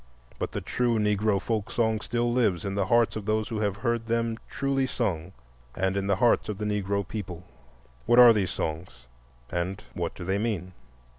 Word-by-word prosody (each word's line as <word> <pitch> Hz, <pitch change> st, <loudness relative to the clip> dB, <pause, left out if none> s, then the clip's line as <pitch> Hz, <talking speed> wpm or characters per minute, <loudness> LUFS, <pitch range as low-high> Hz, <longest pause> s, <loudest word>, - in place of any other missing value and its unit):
But -, -, -2 dB
the -, -, -3 dB
true 120 Hz, -2 st, 0 dB
Negro 105 Hz, -1 st, +2 dB
folk 110 Hz, 0 st, -2 dB
song 110 Hz, -2 st, +1 dB
still 120 Hz, +1 st, 0 dB
lives 105 Hz, -8 st, +1 dB
in 100 Hz, -, -2 dB
the 100 Hz, -2 st, 0 dB
hearts 120 Hz, +1 st, +3 dB
of 110 Hz, -2 st, -5 dB
those 110 Hz, +1 st, 0 dB
who 110 Hz, -3 st, -3 dB
have 100 Hz, -2 st, 0 dB
heard 115 Hz, +1 st, -1 dB
them 115 Hz, 0 st, 0 dB
truly 135 Hz, -1 st, 0 dB
sung 95 Hz, -9 st, -2 dB, 0.4 s
and 95 Hz, 0 st, 0 dB
in 100 Hz, 0 st, -1 dB
the 100 Hz, -, +3 dB
hearts 115 Hz, +2 st, +3 dB
of 105 Hz, -, -3 dB
the 105 Hz, -, -3 dB
Negro 100 Hz, -2 st, -1 dB
people. 90 Hz, -6 st, -6 dB, 0.6 s
What 120 Hz, -, +4 dB
are 120 Hz, -2 st, +10 dB
these 100 Hz, -4 st, 0 dB
songs, 80 Hz, -5 st, -5 dB, 0.5 s
and 90 Hz, +4 st, -2 dB
what 85 Hz, -1 st, -3 dB
do 90 Hz, -, -7 dB
they 95 Hz, +2 st, 0 dB
mean? 100 Hz, -5 st, -2 dB
105 Hz, 195 wpm, -27 LUFS, 95-115 Hz, 0.6 s, are